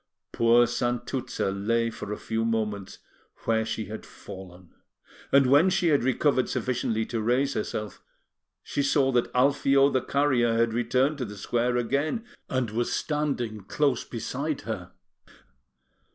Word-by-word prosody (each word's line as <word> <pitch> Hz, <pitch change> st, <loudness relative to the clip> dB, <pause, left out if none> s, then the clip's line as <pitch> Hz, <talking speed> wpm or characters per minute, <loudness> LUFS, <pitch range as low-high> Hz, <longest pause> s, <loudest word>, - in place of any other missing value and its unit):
Poor 115 Hz, +1 st, +5 dB
Santuzza 120 Hz, -2 st, -2 dB
lay 115 Hz, +4 st, 0 dB
for 110 Hz, -2 st, -7 dB
a 105 Hz, -, -3 dB
few 110 Hz, 0 st, -2 dB
moments 105 Hz, -4 st, -2 dB, 0.5 s
where 110 Hz, -1 st, +1 dB
she 110 Hz, 0 st, -3 dB
had 110 Hz, +3 st, -7 dB
fallen; 90 Hz, -2 st, -12 dB, 0.6 s
and 140 Hz, -1 st, +6 dB
when 145 Hz, +8 st, +5 dB
she 180 Hz, -2 st, +2 dB
had 145 Hz, -4 st, +3 dB
recovered 130 Hz, +1 st, +2 dB
sufficiently 115 Hz, -3 st, -1 dB
to 115 Hz, -1 st, -3 dB
raise 125 Hz, +5 st, +1 dB
herself, 105 Hz, -2 st, -4 dB, 0.6 s
she 145 Hz, -, -2 dB
saw 135 Hz, -1 st, +2 dB
that 120 Hz, -2 st, +1 dB
Alfio 140 Hz, +1 st, +4 dB
the 130 Hz, -, +1 dB
carrier 130 Hz, -5 st, +2 dB
had 115 Hz, -1 st, +2 dB
returned 125 Hz, +5 st, +1 dB
to 125 Hz, -, -1 dB
the 105 Hz, -1 st, -9 dB
square 120 Hz, +4 st, 0 dB
again, 140 Hz, -, -1 dB, 0.2 s
and 130 Hz, -5 st, -1 dB
was 120 Hz, +2 st, -1 dB
standing 140 Hz, -8 st, -1 dB
close 140 Hz, +1 st, +1 dB
beside 135 Hz, +5 st, -4 dB
her. 90 Hz, -6 st, -6 dB
120 Hz, 140 wpm, -27 LUFS, 110-135 Hz, 0.6 s, and